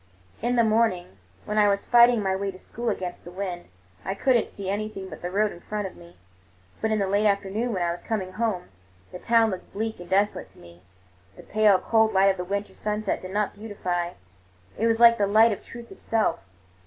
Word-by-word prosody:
In 240 Hz, +2 st, 0 dB
the 235 Hz, -, +4 dB
morning, 215 Hz, -, +1 dB, 0.3 s
when 210 Hz, 0 st, 0 dB
I 210 Hz, -, +5 dB
was 200 Hz, 0 st, 0 dB
fighting 240 Hz, -2 st, +5 dB
my 190 Hz, -1 st, 0 dB
way 200 Hz, +1 st, -2 dB
to 190 Hz, -, -8 dB
school 235 Hz, +5 st, -5 dB
against 180 Hz, -4 st, -4 dB
the -, -, -10 dB
wind, 180 Hz, -1 st, -5 dB, 0.4 s
I 195 Hz, -, -3 dB
could 255 Hz, +5 st, +2 dB
n't 235 Hz, -, +1 dB
see 200 Hz, -2 st, -8 dB
anything 200 Hz, -1 st, -4 dB
but 155 Hz, -, -10 dB
the 175 Hz, -, -3 dB
road 205 Hz, +3 st, +1 dB
in -, -, -11 dB
front 210 Hz, +1 st, -4 dB
of 190 Hz, -, -7 dB
me; 170 Hz, 0 st, -16 dB, 0.6 s
but 220 Hz, -, 0 dB
in 220 Hz, -, +1 dB
the 200 Hz, -, +1 dB
late 200 Hz, +2 st, +2 dB
afternoon, 200 Hz, +4 st, 0 dB
when 185 Hz, -5 st, -1 dB
I 170 Hz, -, 0 dB
was 175 Hz, 0 st, -6 dB
coming 195 Hz, -5 st, -3 dB
home, 210 Hz, -3 st, -2 dB, 0.4 s
the 180 Hz, -, -8 dB
town 230 Hz, 0 st, +3 dB
looked 185 Hz, -1 st, -7 dB
bleak 220 Hz, +1 st, -3 dB
and 175 Hz, -, -10 dB
desolate 200 Hz, +2 st, +1 dB
to -, -, -24 dB
me. 85 Hz, 0 st, -16 dB, 0.6 s
The -, -, -12 dB
pale, 210 Hz, -2 st, +4 dB
cold 220 Hz, +2 st, +2 dB
light 195 Hz, +1 st, +5 dB
of 190 Hz, -, -5 dB
the 180 Hz, -, -3 dB
winter 200 Hz, +3 st, -4 dB
sunset 210 Hz, -1 st, -2 dB
did 185 Hz, -, -8 dB
not 205 Hz, +2 st, -1 dB
beautify—it 175 Hz, -, -5 dB
was 225 Hz, 0 st, +1 dB
like 235 Hz, -1 st, +7 dB
the 200 Hz, -, +2 dB
light 220 Hz, +3 st, +5 dB
of 200 Hz, -, -5 dB
truth 235 Hz, 0 st, -11 dB
itself. 225 Hz, -1 st, -1 dB
200 Hz, 220 wpm, -25 LUFS, 185-220 Hz, 0.6 s, like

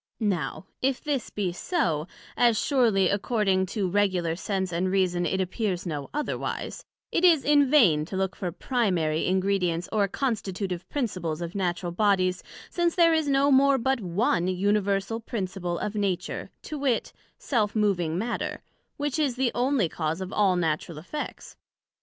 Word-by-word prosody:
Now, 180 Hz, +2 st, -4 dB, 0.2 s
if 265 Hz, 0 st, 0 dB
this 285 Hz, -6 st, -2 dB
be 190 Hz, -4 st, -2 dB
so, 175 Hz, -, -1 dB, 0.3 s
as 235 Hz, -3 st, +4 dB
surely, 225 Hz, -9 st, +3 dB
according 200 Hz, -2 st, +1 dB
to 200 Hz, 0 st, -1 dB
regular 180 Hz, -4 st, +1 dB
Sense 190 Hz, 0 st, -2 dB
and 180 Hz, +2 st, 0 dB
Reason, 180 Hz, -2 st, +1 dB
it 190 Hz, -, -1 dB
appears 190 Hz, 0 st, -2 dB
no 150 Hz, -5 st, -4 dB
otherwise; 295 Hz, +1 st, -3 dB, 0.3 s
it 335 Hz, -, 0 dB
is 330 Hz, -6 st, +5 dB
in 290 Hz, -2 st, +4 dB
vain 195 Hz, -, +5 dB
to 190 Hz, -, -5 dB
look 190 Hz, 0 st, -1 dB
for 180 Hz, -2 st, -3 dB
primary 175 Hz, -, 0 dB
Ingredients, 185 Hz, -3 st, +1 dB
or 205 Hz, -2 st, +2 dB
constitutive 195 Hz, -6 st, -3 dB
principles 185 Hz, -, -2 dB
of 170 Hz, 0 st, -5 dB
Natural 180 Hz, -2 st, -2 dB
Bodies, 185 Hz, -1 st, +2 dB, 0.3 s
since 345 Hz, -1 st, +1 dB
there 335 Hz, -2 st, +5 dB
is 315 Hz, -2 st, +1 dB
no 280 Hz, +1 st, +3 dB
more 275 Hz, +1 st, +5 dB
but 265 Hz, 0 st, 0 dB
one 180 Hz, -1 st, +1 dB
Universal 200 Hz, +3 st, 0 dB
Principle 185 Hz, -6 st, -3 dB
of 210 Hz, -, -3 dB
Nature, 195 Hz, -4 st, -2 dB
to 300 Hz, -, -6 dB
wit, 265 Hz, -5 st, 0 dB, 0.2 s
self 215 Hz, -6 st, 0 dB
moving 180 Hz, -6 st, +1 dB
Matter, 230 Hz, +5 st, -3 dB, 0.3 s
which 290 Hz, 0 st, -1 dB
is 280 Hz, -5 st, +1 dB
the 250 Hz, -2 st, +1 dB
onely 245 Hz, -5 st, +2 dB
cause 160 Hz, +1 st, -2 dB
of 190 Hz, +1 st, -5 dB
all 195 Hz, -3 st, +3 dB
natural 165 Hz, -1 st, -1 dB
effects. 290 Hz, -, -7 dB
195 Hz, 155 wpm, -26 LUFS, 180-245 Hz, 0.3 s, is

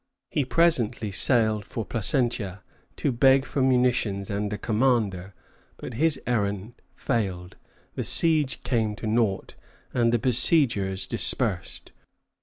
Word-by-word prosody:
He 145 Hz, -, 0 dB
presently 125 Hz, -9 st, +1 dB
sailed 110 Hz, 0 st, +2 dB
for 110 Hz, +1 st, -6 dB
Placentia 110 Hz, -4 st, -1 dB, 0.3 s
to 140 Hz, -, -1 dB
beg 135 Hz, +2 st, +4 dB
for 140 Hz, -, -2 dB
munitions 125 Hz, -6 st, +1 dB
and 100 Hz, +1 st, -2 dB
a 105 Hz, -, -3 dB
commander; 105 Hz, -5 st, 0 dB, 0.4 s
but -, -, -8 dB
his 145 Hz, +3 st, +1 dB
errand 105 Hz, -2 st, -2 dB, 0.2 s
failed, 95 Hz, -6 st, -3 dB, 0.4 s
the -, -, -3 dB
siege 155 Hz, -7 st, +2 dB
came 110 Hz, -4 st, -1 dB
to 110 Hz, -, -8 dB
nought, 110 Hz, -3 st, 0 dB, 0.4 s
and 120 Hz, -2 st, +2 dB
the 120 Hz, -, +3 dB
besiegers 115 Hz, -, +2 dB
dispersed. -, -, -1 dB
115 Hz, 120 wpm, -25 LUFS, 100-130 Hz, 0.4 s, beg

